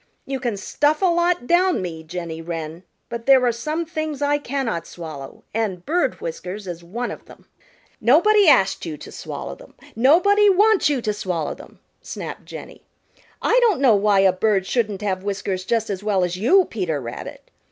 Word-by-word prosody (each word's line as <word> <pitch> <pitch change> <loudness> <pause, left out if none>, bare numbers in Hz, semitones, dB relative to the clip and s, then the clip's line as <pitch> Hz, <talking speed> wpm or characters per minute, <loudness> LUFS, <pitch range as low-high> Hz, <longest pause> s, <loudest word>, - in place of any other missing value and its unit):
You 270 0 -3
can 240 -5 -2
stuff 295 - 0
a - - +5
lot 345 -4 +2
down 360 +4 +3
me, 170 -3 -5
Jenny 165 0 -6
Wren, 165 0 -6 0.3
but 235 0 -7
there 265 -2 +6
are 240 - +3
some 305 +8 -3
things 310 -3 -4
I 290 0 +1
cannot 245 - -3
swallow, 155 -5 -9
and 205 -5 -2
bird 350 +3 0
whiskers 210 - -6
is 175 -2 -7
one 235 +8 -4
of - - -10
them." - - -16 0.6
"Nobody 360 - +5
asked 195 -10 +4
you 160 -3 -5
to - - -11
swallow - - -6
them. - - -16 0.2
Nobody 385 - +5
wants 410 -1 +4
you 270 -5 -1
to 210 - 0
swallow 180 -7 -3
them," - - -15 0.2
snapped - - -7
Jenny. - - -10 0.6
"I - - +4
don't 440 - +3
know 265 -5 +5
why 200 -1 +3
a 190 -1 +4
bird 195 0 +1
shouldn't 210 -2 -1
have 190 -2 -1
whiskers 195 -2 -3
just 225 +1 0
as 190 -1 -4
well 200 -3 +1
as 180 0 -1
you, 350 - +4
Peter 180 - -3
Rabbit. 120 -2 -8
225 Hz, 185 wpm, -22 LUFS, 185-305 Hz, 0.6 s, there